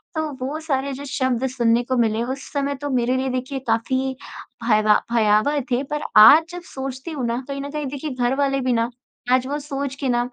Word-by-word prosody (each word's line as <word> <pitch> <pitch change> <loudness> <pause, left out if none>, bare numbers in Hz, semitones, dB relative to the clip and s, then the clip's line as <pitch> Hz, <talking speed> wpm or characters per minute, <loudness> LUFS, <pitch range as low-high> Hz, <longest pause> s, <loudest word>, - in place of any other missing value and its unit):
तो 315 -1 -1 0.2
वो 295 +4 -3
सारे 275 -3 -2
जो 280 +2 -7
शब्द 260 -1 0
सुनने 235 0 +3
को 255 +1 -1
मिले 225 -1 +1
उस 265 +3 -6
समय 280 0 -1
तो 290 - -3
मेरे 250 -1 +1
लिए 265 +1 -1
देखिए 265 +2 -4
काफ़ी 260 +4 0 0.5
भयवा 215 -2 +4
भयावह 220 +6 +3
थे 245 +2 +1
पर 295 - -1 0.2
आज 280 +10 +9
जब 355 0 -7
सोचती 265 +3 -5
हूँ 275 -5 -3
ना 235 +2 -1
कहीं 275 0 -4
न 280 - -5
कहीं 300 0 -3
देखिए 285 +2 -5
घर 245 +1 +1
वाले 275 -1 +1
भी 255 -1 +1
ना, 230 0 +1 0.4
आज 255 0 +3
वो 285 +2 -2
सोच 280 -2 -4
के 275 - -2
ना 240 -1 +2
265 Hz, 215 wpm, -22 LUFS, 240-280 Hz, 0.5 s, आज